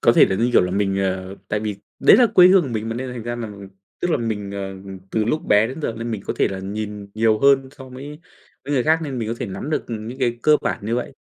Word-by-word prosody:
có - - +5
thể - - +7
là, 95 - -1
như 120 +3 +1
kiểu - - +6
là, 90 - -1
mình 95 0 0
ờ 95 0 -2
tại 105 0 -1
vì 105 -2 -3 0.2
đấy - - +7
là 245 - +6
quê 180 -4 +6
hương 190 -1 +6
của 140 - -4
mình 110 -2 -3
mà 115 - -3
nên 125 +1 -4
thành 120 -3 -6
ra 120 +1 -4
là 115 -2 -5 0.5
tức 175 - 0
là - - +3
mình, 105 -4 -3
ờ, 95 -1 -5 0.4
từ 110 -1 0
lúc 155 +8 -1
bé 105 +1 +4
đến 130 +7 -7
giờ 115 - -1
nên 115 +1 -4
mình 105 -3 -4
có - - -1
thể - - +2
là 95 - -5
nhìn 105 +1 -5
nhiều 110 0 +2
hơn 135 0 +4
so 130 -1 -10
với 140 +4 -9 0.4
người 140 -3 0
khác, 160 +1 +4
nên 140 -5 -4
mình 110 -2 -3
có 115 - -2
thể 125 - -3
nắm 115 +10 -6
được, - - -1
ừm, 110 -1 -5
những 130 - -8
cái 120 -3 0
cơ 150 0 +5
bản 105 - -3
như 115 - 0
vậy. 125 +3 -3
115 Hz, 295 wpm, -21 LUFS, 105-130 Hz, 0.5 s, thể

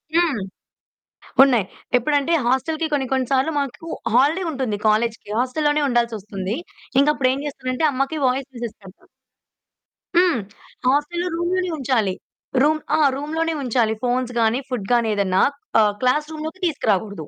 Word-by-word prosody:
హ్మ్. 320 - +2 1.0
ఉన్నాయి. 245 -7 +4 0.3
ఎప్పుడంటే 290 +5 +1
హోస్టలకి 315 +6 0
కొన్ని 270 -2 +1
కొన్ని 260 -2 +1
సార్లు 270 +4 +2
మాకు 280 +4 -4 0.3
హాలిడే 300 +9 +3
ఉంటుంది. 260 -8 -2
కాలేజీ‌కి 220 0 0
హోస్టలు 260 +5 0
లోనే 295 0 +2
ఉండాల్సొస్తుంది. 215 -4 -1 0.4
ఇంక 280 - +3
అప్పుడు 255 -1 +2
ఏం 275 - -3
చేస్తానంటే 270 +1 -1
అమ్మకి 275 +4 -1
వాయిస్ 265 +2 -1
మెసేజ్ 235 -2 -6
పెడతా. 190 0 -15 1.1
హ్మ్. 345 - +4 0.5
హోస్టలులో 295 +6 +1
రూమ్‌ 345 +1 -1
లోనే 365 -1 0
ఉంచాలి. 240 -8 +1 0.5
రూమ్ 310 +2 +3 0.2
ఆ! - - +1 0.2
రూమ్‌లోనే 320 +3 -2
ఉంచాలి 230 -3 +1
ఫోన్స్ 250 0 0
గాని 225 +3 +2
ఫుడ్ 220 -6 -3
గాని 235 -2 +3
ఏదన్నా 190 -2 +2 0.4
ఆహ్, 210 -1 +3
క్లాస్ 300 +5 +2
రూమ్‌లోకి 315 +5 -6
తీసుకురాకూడదు. 205 - -1
260 Hz, 140 wpm, -22 LUFS, 230-305 Hz, 1.1 s, ఉన్నాయి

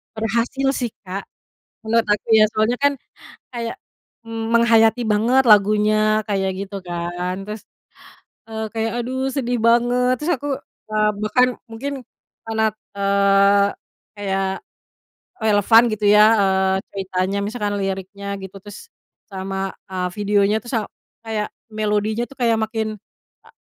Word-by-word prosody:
Berhasil 230 +5 -1
sih, 245 -4 -3
Kak, 190 +1 -5 0.6
menurut 225 0 +2
aku 205 -1 0
ya. 220 -1 +7
Soalnya 220 +3 +1
kan, 285 0 +4 0.6
kayak 235 -1 -4 0.5
menghayati 225 0 +3
banget 230 +5 +3
lagunya 215 +1 +4
kayak 195 -2 0
gitu 200 0 -8
kan. 175 +1 -3
Terus, 210 +1 -7 0.9
eee, 220 0 -4
kayak, 225 0 -1
aduh 260 +2 -2
sedih 245 -3 -1
banget. 245 +2 +3
Terus 320 +4 0
aku, 290 - -5 0.4
eee, 215 0 +2
bahkan 250 +4 +3 0.2
mungkin 255 +6 -5 0.5
karena, 220 0 0 0.3
eee, 200 0 +4 0.5
kayak 195 -1 -1 1.0
relevan 220 +1 +5
gitu 215 0 -3
ya, 210 +1 +7 0.2
eee, 190 -1 +2 0.2
ceritanya, 190 0 -2
misalkan 210 -1 -2
liriknya 195 +1 -4 0.2
gitu, 190 +1 -9
terus 205 - -12 0.4
sama, 195 0 -4 0.2
eee, 185 -1 -2
videonya, 205 0 +2
terus 240 +4 -7
a - - -4 0.4
kayak 220 -2 -2 0.2
melodinya 215 +1 -1
tuh 275 - -15
kayak 230 -2 +3
makin, 220 0 -2 0.5
a - - -19
215 Hz, 125 wpm, -21 LUFS, 200-230 Hz, 1.0 s, ya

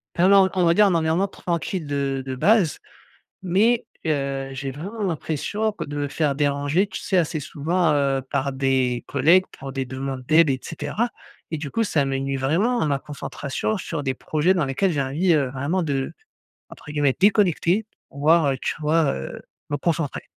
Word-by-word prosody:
enfin, 180 +2 +4
non, 195 -1 +7
on 185 -1 +1
va 170 - +4
dire, 210 +2 +6
un 190 - +3
environnement 165 +4 +1
tranquille 170 -2 -3
de 140 -2 -1
de 130 -1 -5
base 200 - +3 0.7
mais, 215 +7 +2 0.2
heu, 140 -3 -1
j'ai 135 0 -4
vraiment 195 - -6
l'impression 180 +5 -1
que 210 - -6
de 145 0 -6
me 145 -1 -1
faire 150 -1 0
déranger 145 +6 +1
tu 190 - -6
sais, 190 - -1
assez 160 -2 0
souvent, 160 +3 0
heu, 140 -1 +1
par 140 0 -1
des 130 -2 0
collègues 165 +7 +4 0.2
pour 135 - -6
des 135 -1 -2
demandes 130 0 -5
d'aide 160 -1 +5
et 130 - 0
cetera 230 +8 -3 0.4
et 160 - 0
du 145 -2 -5
coup, 230 - 0
ça 155 -8 +1
me 135 0 -1
nuit 135 0 -2
vraiment 180 - +1
à - - +1
ma 140 -2 +1
concentration 145 +6 -4
sur 165 -4 -4
des 135 -2 -1
projets 155 +7 +1
dans 170 -4 +1
lesquels 135 +8 0
j'ai 145 - -1
envie, 155 +7 +1
heu, 140 -4 +1
vraiment 145 +8 -1
de, 135 -3 -2 0.6
entre 150 - -11
guillemets 145 -3 +1
«déconnecter», 200 0 +3 0.3
voir, 150 +2 +3
heu, 135 - -2
tu - - -1
vois, 155 +1 +2
heu, 65 0 -6 0.3
me 145 - -1
concentrer. 160 -1 -1
150 Hz, 190 wpm, -23 LUFS, 135-180 Hz, 0.7 s, non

